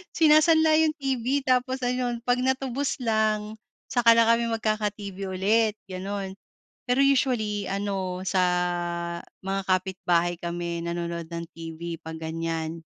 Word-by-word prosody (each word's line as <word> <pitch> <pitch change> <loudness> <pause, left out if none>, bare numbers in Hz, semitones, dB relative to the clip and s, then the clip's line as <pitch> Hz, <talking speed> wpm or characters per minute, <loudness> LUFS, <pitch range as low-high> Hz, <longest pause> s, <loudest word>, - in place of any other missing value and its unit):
Sinasanla 315 0 +5
yung 315 -1 +3
TV 270 -1 -1
tapos 255 0 +1
ayun 245 -1 -1
pag 245 +1 +1
natubos 265 +1 -1
lang 215 -2 0 0.3
saka 240 -2 +5
lang 230 0 +4
kami 230 0 +3
magkaka-TV 215 -3 -2 0.2
ulit 215 +4 +2 0.2
ganon. 195 +1 -5 0.5
Pero 250 +1 +2
usually 240 -7 +2
ano 195 -2 -2
sa 190 0 +1 1.0
mga 195 +1 -2
kapitbahay 180 -2 +1
kami 170 0 -4
nanonood 170 0 -3
ng 170 0 -4
TV 165 +1 -7
pag 160 0 -6
ganyan 165 0 -4
210 Hz, 120 wpm, -26 LUFS, 180-250 Hz, 1.0 s, Sinasanla